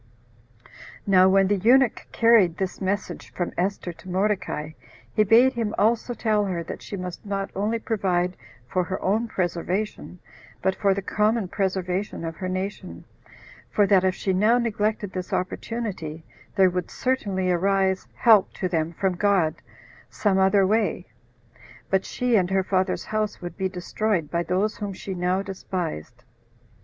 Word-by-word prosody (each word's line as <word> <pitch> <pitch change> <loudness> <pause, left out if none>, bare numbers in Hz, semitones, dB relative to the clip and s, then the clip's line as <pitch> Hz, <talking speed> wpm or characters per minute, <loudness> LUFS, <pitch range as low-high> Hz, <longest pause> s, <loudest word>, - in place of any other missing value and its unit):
Now 190 -1 +5
when 195 0 +4
the 205 +1 +2
eunuch 240 +5 +3
carried 225 -8 +4
this 190 0 -3
message 200 +2 -3
from 175 - -3
Esther 185 -1 -2
to 185 - -13
Mordecai, 185 -5 -1 0.4
he 215 - +4
bade 235 +5 +5
him 225 -3 -2
also 235 +2 +1
tell 215 -3 +1
her 175 -3 -2
that - - -7
she 200 - -6
must 180 -1 -6
not 195 -1 -3
only 210 +4 0
provide 185 -5 0 0.3
for 180 +8 0
her 190 +1 -3
own 215 +5 0
preservation, 185 +1 -3 0.4
but 190 - +1
for 195 0 +1
the 200 - -3
common 210 -1 +1
preservation 190 -1 -2
of 165 0 -4
her 185 -1 -4
nation, 185 - -5 0.7
for 205 - +3
that 195 -2 +4
if 185 0 +1
she 190 - -1
now 215 +6 +4
neglected 215 -3 -1
this 185 -1 -5
opportunity, 180 -6 -4 0.3
there 190 -2 +5
would 180 -1 -3
certainly 200 -8 -1
arise 190 +1 +1
help 220 -5 +5
to 185 - -2
them 165 -2 -1
from 190 +2 0
God 180 -4 +2 0.6
some 195 -3 +1
other 195 +1 +4
way, 215 +3 0 0.9
but 190 0 +2
she 250 -2 0
and 185 -4 +3
her 190 0 +2
father's 185 0 0
house 215 -1 -2
would 175 0 -7
be 190 -1 -1
destroyed 180 -2 -2
by 170 - +1
those 185 +5 0
whom 205 -1 -4
she 190 +1 -6
now 180 +2 0
despised. 150 - -5
190 Hz, 155 wpm, -24 LUFS, 180-210 Hz, 0.9 s, Now